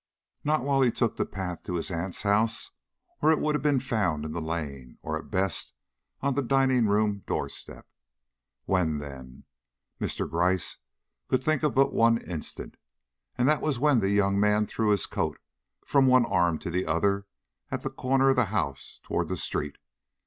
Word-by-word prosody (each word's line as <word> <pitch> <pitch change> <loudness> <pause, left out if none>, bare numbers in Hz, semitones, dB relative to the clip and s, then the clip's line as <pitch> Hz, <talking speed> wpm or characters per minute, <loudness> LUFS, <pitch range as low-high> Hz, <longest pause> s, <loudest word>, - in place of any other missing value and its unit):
Not 150 -2 +1
while 135 0 +2
he 130 - +5
took 115 -1 0
the - - -1
path 90 -3 -5
to 90 - -3
his 85 - -2
aunt's 90 +3 -3
house, 110 +3 +1 0.5
or 155 - +5
it 160 - +4
would 150 - +1
have 150 - 0
been 145 -3 +3
found 105 - -1
in 80 - -4
the 85 +1 -3
lane, 70 -6 -5
or, - - -2
at - - -6
best, 95 -1 -1 0.5
on 140 0 +1
the 140 - 0
dining 130 -2 +3
room 105 -1 +1
door - - -1
step. - - -9 0.8
When, 85 -5 +1
then? 70 -2 -9 0.6
Mr. - - -2
Gryce 90 +3 0 0.5
could 130 0 +1
think 155 -1 +1
of 150 -3 0
but 135 +1 +4
one 115 0 +4
instant, 85 -8 -6 0.6
and 125 - +2
that 150 0 +3
was 150 -4 0
when 140 -1 +4
the 95 -2 +1
young 100 -1 +2
man 105 +1 +3
threw 110 +1 -1
his 100 -3 +3
coat - - -2 0.5
from 135 -2 +4
one 130 -1 +5
arm 85 -5 +2
to 85 - -5
the 90 +1 -1
other 100 +5 +1 0.4
at - - -4
the - - -3
corner 135 +1 +2
of 135 - +3
the 125 - +4
house 70 -10 -3
toward - - -1
the - - -3
street. 75 -1 -3
105 Hz, 185 wpm, -27 LUFS, 85-130 Hz, 0.8 s, he